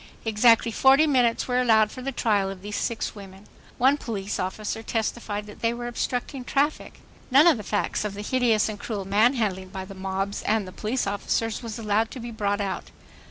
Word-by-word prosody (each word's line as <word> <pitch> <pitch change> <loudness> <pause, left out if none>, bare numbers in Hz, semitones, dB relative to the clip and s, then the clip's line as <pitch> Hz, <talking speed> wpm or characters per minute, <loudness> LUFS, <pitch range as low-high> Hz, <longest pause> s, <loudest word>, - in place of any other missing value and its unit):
Exactly 230 +1 +4
forty 270 +6 +5
minutes 250 -6 +2
were 250 0 +2
allowed 220 -3 +4
for 255 - -8
the 275 +2 -3
trial 205 -6 +1
of 195 -1 -8
these 205 0 -5
six 230 -2 -2
women. 195 -1 -12 0.3
One 265 +4 +4
police 210 -7 -4
officer 210 +4 -3
testified 220 -2 -3
that 210 - -13
they 230 0 +1
were 240 0 -6
"obstructing 245 +2 -3
traffic." 285 +4 -1 0.3
None 275 +4 +6
of 335 -7 +6
the - - -5
facts 205 +1 -1
of 210 -1 -4
the 205 - -6
hideous 235 -2 +2
and 210 -2 -5
cruel 205 -4 -4
manhandling 205 -2 +1
by 190 0 -6
the 195 - -10
mobs 195 +1 -3
and 205 -4 -1
police 230 +4 -1
officers 205 +2 -1
was 230 -2 -6
allowed 220 0 0
to 260 - -8
be 235 0 -6
brought 205 -2 -1
out. 195 -1 -4
220 Hz, 195 wpm, -25 LUFS, 205-245 Hz, 0.3 s, None